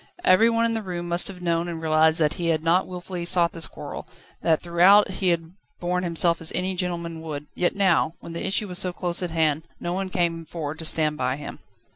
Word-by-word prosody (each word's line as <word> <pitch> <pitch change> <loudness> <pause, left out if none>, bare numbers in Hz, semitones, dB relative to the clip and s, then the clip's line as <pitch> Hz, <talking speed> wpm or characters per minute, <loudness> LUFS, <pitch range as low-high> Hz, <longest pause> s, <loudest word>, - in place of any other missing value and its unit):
Every 210 +5 +5
one 230 0 +2
in 230 - 0
the 225 - -2
room 175 -3 -5
must 170 +1 +2
have 180 -2 -6
known 170 0 0
and 170 -1 -5
realised 160 0 +3
that 150 -2 +2
he 170 - -3
had 160 -1 +1
not 170 +3 +2
wilfully 180 -1 -6
sought 170 0 +3
this 165 -1 -2
quarrel, - - -8 0.3
that 160 -2 +2
throughout 180 +4 +5
he 185 0 0
had 165 -1 -1 0.3
borne 180 +1 -1
himself 170 -1 +2
as 165 - -3
any 185 +1 -1
gentleman 170 -2 -4
would, 150 -2 -6
yet 175 - 0
now, 185 -5 +2
when 165 - -9
the 170 - -4
issue 200 +2 0
was 180 -1 -3
so 185 -2 0
close 175 0 -2
at 180 - -2
hand, 160 -2 +1 0.2
no 175 - -3
one 190 +1 -3
came 170 -3 -1
forward 160 -1 -6
to 160 - -5
stand 155 -1 +2
by 130 -1 0
him. 145 - -8
170 Hz, 230 wpm, -24 LUFS, 160-180 Hz, 0.3 s, Every